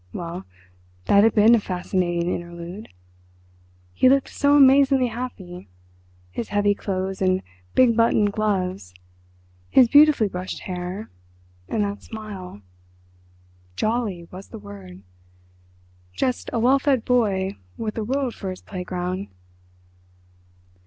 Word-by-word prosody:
Well, 175 Hz, +1 st, -6 dB, 0.6 s
that 200 Hz, 0 st, +5 dB
had 225 Hz, -, +3 dB
been 215 Hz, +2 st, +6 dB
a 235 Hz, -, +5 dB
fascinating 180 Hz, -2 st, -1 dB
interlude! 175 Hz, +3 st, -7 dB, 1.0 s
He 255 Hz, -, +4 dB
looked 275 Hz, 0 st, +2 dB
so 285 Hz, 0 st, +3 dB
amazingly 270 Hz, -2 st, +5 dB
happy: 195 Hz, -, -7 dB, 0.6 s
his 225 Hz, -, -4 dB
heavy 205 Hz, 0 st, +2 dB
clothes 190 Hz, -1 st, -4 dB
and 185 Hz, 0 st, +1 dB, 0.3 s
big 240 Hz, -3 st, +5 dB
buttoned 220 Hz, -3 st, +3 dB
gloves; 185 Hz, -, -2 dB, 0.7 s
his 255 Hz, -2 st, +6 dB
beautifully 290 Hz, -4 st, +6 dB
brushed 185 Hz, -1 st, -6 dB
hair... 180 Hz, +3 st, -6 dB, 0.6 s
and 215 Hz, -, 0 dB
that 200 Hz, 0 st, -4 dB
smile.... 195 Hz, -, -9 dB, 1.1 s
"Jolly" 215 Hz, -6 st, -2 dB
was 190 Hz, +2 st, -10 dB
the -, -, -10 dB
word—just 90 Hz, -, -8 dB
a -, -, -2 dB
well 255 Hz, +4 st, +4 dB
fed 265 Hz, -4 st, +1 dB
boy 200 Hz, -6 st, +1 dB, 0.2 s
with 215 Hz, -1 st, -3 dB
the 225 Hz, -, -3 dB
world 260 Hz, +2 st, -1 dB
for 195 Hz, -, -6 dB
his 185 Hz, -, -8 dB
playground. 180 Hz, 0 st, -4 dB
195 Hz, 115 wpm, -23 LUFS, 175-230 Hz, 1.1 s, been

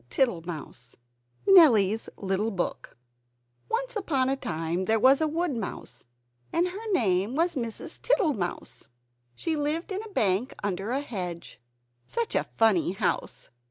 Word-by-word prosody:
TITTLEMOUSE 165 Hz, -, -2 dB, 0.5 s
[Nellie's 225 Hz, -, +6 dB
Little 195 Hz, +2 st, -1 dB
Book] 185 Hz, -, -4 dB, 0.7 s
Once -, -, -2 dB
upon 280 Hz, -11 st, 0 dB
a 270 Hz, -, +1 dB
time 170 Hz, -6 st, -3 dB
there 220 Hz, +3 st, +2 dB
was 265 Hz, +5 st, +5 dB
a 315 Hz, -, +3 dB
woodmouse, 300 Hz, -, -4 dB, 0.5 s
and 350 Hz, +2 st, +1 dB
her 425 Hz, +4 st, -6 dB
name 205 Hz, -, +1 dB
was 335 Hz, +2 st, +1 dB
Mrs. 230 Hz, -4 st, -5 dB
Tittlemouse. 300 Hz, -, -1 dB, 0.5 s
She 325 Hz, -2 st, -2 dB
lived 305 Hz, +6 st, -2 dB
in 385 Hz, +2 st, -2 dB
a 445 Hz, -, -9 dB
bank 215 Hz, -, 0 dB
under 200 Hz, +1 st, -2 dB
a 265 Hz, +3 st, 0 dB
hedge. 180 Hz, -10 st, -6 dB, 0.5 s
Such 470 Hz, -1 st, -2 dB
a -, -, +1 dB
funny 200 Hz, -6 st, +3 dB
house! 195 Hz, -, -2 dB
240 Hz, 130 wpm, -27 LUFS, -, 0.7 s, Nellie's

